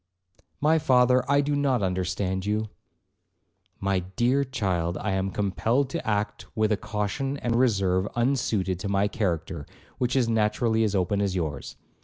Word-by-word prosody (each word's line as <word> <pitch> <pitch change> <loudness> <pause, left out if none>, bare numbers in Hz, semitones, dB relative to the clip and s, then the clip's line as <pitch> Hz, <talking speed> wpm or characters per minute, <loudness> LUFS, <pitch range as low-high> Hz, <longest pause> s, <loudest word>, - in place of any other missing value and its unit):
'My 160 +2 +3
father, 125 -2 +4
I 140 0 +5
do 145 +1 0
not 135 -6 +1
understand 95 +1 -1
you.' 105 +2 -1 1.1
'My 95 -1 +1
dear 120 +10 +1
child, 95 -9 -1
I 105 - -2
am 95 0 0
compelled 115 +7 0
to 170 - -3
act 105 -1 -1
with 110 0 +2
a - - +4
caution 110 +8 -3
and 120 -4 -1
reserve 100 -6 +2
unsuited 115 -7 0
to 100 +1 -4
my 100 +1 +2
character, 85 -8 -2 0.3
which 125 +1 0
is 130 -3 +3
naturally 110 0 +1
as 105 -2 0
open 100 +2 +1
as 100 -2 0
yours. 75 -6 -3
105 Hz, 155 wpm, -26 LUFS, 95-125 Hz, 1.1 s, I